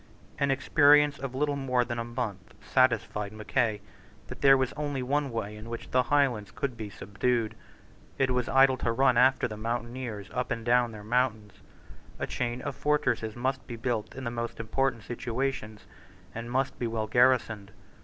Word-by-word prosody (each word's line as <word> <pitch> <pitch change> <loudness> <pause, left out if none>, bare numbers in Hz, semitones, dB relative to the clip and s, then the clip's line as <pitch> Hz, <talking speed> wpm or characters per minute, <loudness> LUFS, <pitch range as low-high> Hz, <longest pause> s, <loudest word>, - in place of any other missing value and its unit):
An 140 - +2
experience 145 +1 +4
of 130 -1 -5
little 145 +1 0
more 130 -3 +1
than 120 -1 -4
a - - -1
month 115 -6 -5
satisfied 115 -5 +1
Mackay 110 0 -1 0.5
that - - -8
there 135 -1 +7
was 130 -1 -1
only 145 -3 -3
one 140 +2 0
way 105 -3 -4
in 110 +2 -10
which 115 0 -7
the 130 - +4
Highlands 125 -6 +1
could 135 +4 -3
be 110 -2 -6
subdued. 110 +3 -1 0.6
It 135 -1 +2
was 125 -1 0
idle 135 0 +5
to 115 - 0
run 130 +1 +3
after 125 +1 +4
the 110 -2 -7
mountaineers 115 -2 -4
up 125 0 -2
and 115 -1 -3
down 120 0 +3
their 105 -1 -9
mountains. 110 -2 0 0.6
A - - -2
chain 120 0 -3
of 145 -2 -4
fortresses 125 -7 0
must 130 +2 -2
be 120 - -5
built 115 -2 -3
in 135 - -6
the 120 - -2
most 115 0 -4
important 115 +1 -1
situations, 120 -2 -3 0.5
and 115 +1 -6
must 135 +2 -1
be 120 - -1
well 115 -1 -2
garrisoned. 110 -3 +2
120 Hz, 175 wpm, -28 LUFS, 110-135 Hz, 0.6 s, there